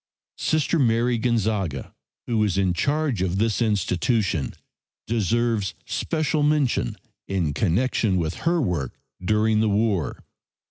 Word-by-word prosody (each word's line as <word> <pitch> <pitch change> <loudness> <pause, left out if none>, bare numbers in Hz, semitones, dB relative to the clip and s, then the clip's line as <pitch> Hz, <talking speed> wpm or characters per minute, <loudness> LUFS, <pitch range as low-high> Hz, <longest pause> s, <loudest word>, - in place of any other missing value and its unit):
Sister 155 +1 +1
Mary 120 -1 +2
Gonzaga, 105 - -1 0.3
who 115 -2 0
was 105 -3 +1
in 95 -2 +2
charge 140 - 0
of 95 0 0
this 110 -1 +1
institution, 100 - 0 0.5
deserves 115 -2 0
special 155 -1 -1
mention 145 - +1 0.3
in 90 -7 0
connection 100 - +1
with 80 -3 -2
her 175 0 +2
work 85 - -2 0.3
during 110 +2 +2
the 110 0 +2
war. 100 -7 0
110 Hz, 120 wpm, -24 LUFS, 95-120 Hz, 0.5 s, Mary